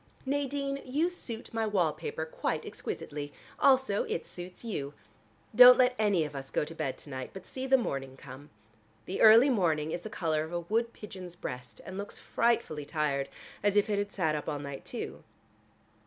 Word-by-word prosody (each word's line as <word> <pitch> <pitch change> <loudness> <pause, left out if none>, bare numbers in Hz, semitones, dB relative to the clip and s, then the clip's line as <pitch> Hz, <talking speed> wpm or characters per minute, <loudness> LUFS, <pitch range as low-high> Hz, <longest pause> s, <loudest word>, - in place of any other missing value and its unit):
Nadine, 275 0 -1
you 300 +7 0
suit 235 -12 -7
my 225 -1 0
wall 180 -7 +2
paper 160 0 -4
quite 160 - -2
exquisitely. 145 0 -5 0.3
Also 260 -7 +4
it 165 - -3
suits 180 +5 -8
you. 145 -10 -4 0.6
Don't 250 +2 +10
let 250 0 +5
any 205 -6 +3
of 145 -1 -8
us 135 0 -6
go - - 0
to 160 - -8
bed 135 -5 -3
to - - -8
night, 130 -1 -5
but 190 -1 -9
see 260 0 -5
the 265 0 +6
morning 135 - -3
come. 135 +3 -11 0.6
The 185 - -3
early 230 +5 +8
morning 160 -8 +1
is 175 - -3
the 215 - -7
color 160 -6 0
of 160 +2 -8
a 175 - -1
wood 230 +7 0
pigeon's 185 -6 -9
breast, 125 -7 -7
and 190 +1 -6
looks 200 - -6
frightfully 230 -11 0
tired, 145 -2 -1 0.3
as 205 0 +2
if 205 +1 +3
it 205 - +1
had 205 0 -2
sat 160 -5 0
up 150 +1 -3
all 150 - -2
night 140 -1 -7
too. - - -6
185 Hz, 190 wpm, -30 LUFS, 150-230 Hz, 0.6 s, Don't